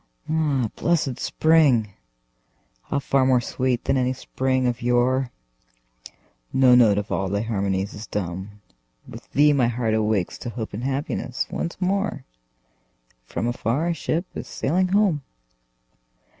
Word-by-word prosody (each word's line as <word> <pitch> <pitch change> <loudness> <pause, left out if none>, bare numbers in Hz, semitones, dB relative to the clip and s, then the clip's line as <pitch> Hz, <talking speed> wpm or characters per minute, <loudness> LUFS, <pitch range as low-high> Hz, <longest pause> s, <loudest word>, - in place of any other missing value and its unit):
Ah, 150 -6 +1
blessed 155 -7 0
spring!—how 95 - -1
far 135 -1 +2
more 130 -1 +4
sweet 125 0 -1
than 135 - +1
any 130 0 +1
spring 130 0 -1
of 120 -1 -1
yore! 125 +2 +2 1.2
No 130 -1 +5
note 115 -5 +6
of 105 +1 -3
all 95 -1 -1
thy 100 +1 0
harmonies 100 -3 -1
is 105 +1 -8
dumb; 100 +2 -5 0.5
With - - -12
thee 150 +1 +5
my 130 -4 +3
heart 115 -2 -1
awakes 110 -4 0
to - - -5
hope 115 -2 -6
and 110 +4 -5
happiness 135 -2 -2
once 170 - -4
more, 195 +2 0
And 140 - -11 1.0
from - - -3
afar 120 +7 -1
a - - +1
ship 165 +1 -2
is - - -6
sailing 180 +7 0
home! 190 -5 +2
125 Hz, 140 wpm, -23 LUFS, 105-140 Hz, 1.2 s, note